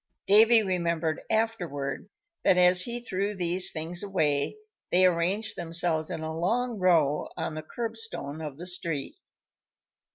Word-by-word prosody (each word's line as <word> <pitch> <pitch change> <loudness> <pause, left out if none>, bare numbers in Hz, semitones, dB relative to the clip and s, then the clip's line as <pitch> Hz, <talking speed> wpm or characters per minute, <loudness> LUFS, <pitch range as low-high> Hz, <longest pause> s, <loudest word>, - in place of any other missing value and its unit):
Davy 220 +3 +6
remembered 170 -4 -1
afterward 190 -9 -2 0.3
that, 180 - +4
as 180 0 +5
he 240 +4 -3
threw 200 -2 -2
these 180 0 +3
things 165 +2 -2
away, 155 - 0 0.3
they 185 +1 +5
arranged 185 +5 0
themselves 165 -2 0
in 160 - -5
a 160 0 -4
long 230 +7 -1
row 160 -6 +2
on - - -3
the 155 - -5
curb 225 +8 -5
stone 160 -9 -5
of 150 -3 -6
the 175 - -8
street. 170 -6 -3
180 Hz, 140 wpm, -27 LUFS, 160-205 Hz, 0.3 s, Davy